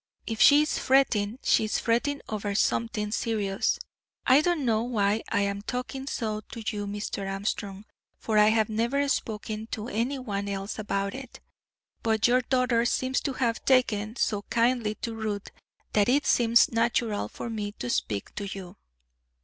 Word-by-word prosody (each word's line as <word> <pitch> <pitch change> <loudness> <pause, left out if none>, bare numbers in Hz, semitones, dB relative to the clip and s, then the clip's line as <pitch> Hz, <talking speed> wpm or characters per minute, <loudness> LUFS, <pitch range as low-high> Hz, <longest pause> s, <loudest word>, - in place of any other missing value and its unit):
If 225 -1 -3
she 290 +1 +8
is 305 - -1
fretting, 240 -5 +2
she 220 - +3
is 215 - 0
fretting 245 +5 0
over 205 -1 -3
something 215 0 0
serious. 210 -4 0 0.5
I 265 +3 +6
don't 335 -4 0
know 220 -2 +2
why 215 -3 +1
I 205 - +2
am 200 0 -1
talking 260 +4 -5
so 215 -5 -2
to 230 - -7
you, 205 0 -3
Mr. 200 -1 -4
Armstrong, 195 0 -4 0.3
for 215 -2 +1
I 210 - +6
have 220 -1 +3
never 235 +6 0
spoken 220 -4 -3
to 220 +2 -4
any 240 +6 -1
one 200 -6 -3
else 200 +2 -4
about 200 -1 -2
it; 265 -2 -9 0.6
but 220 -1 +1
your 250 +1 +4
daughter 250 -2 +2
seems 260 +2 0
to 275 - -2
have 235 -3 -1
taken 225 -5 +2
so 210 -5 0
kindly 235 -2 +1
to 230 - -2
Ruth 215 -2 -4 0.4
that 210 +1 +3
it 280 +3 +3
seems 235 -1 +4
natural 230 -2 0
for - - -7
me 210 -3 -4
to 125 - -6
speak 105 -4 -2
to 205 - -5
you." 195 0 -8
220 Hz, 165 wpm, -27 LUFS, 205-245 Hz, 0.6 s, she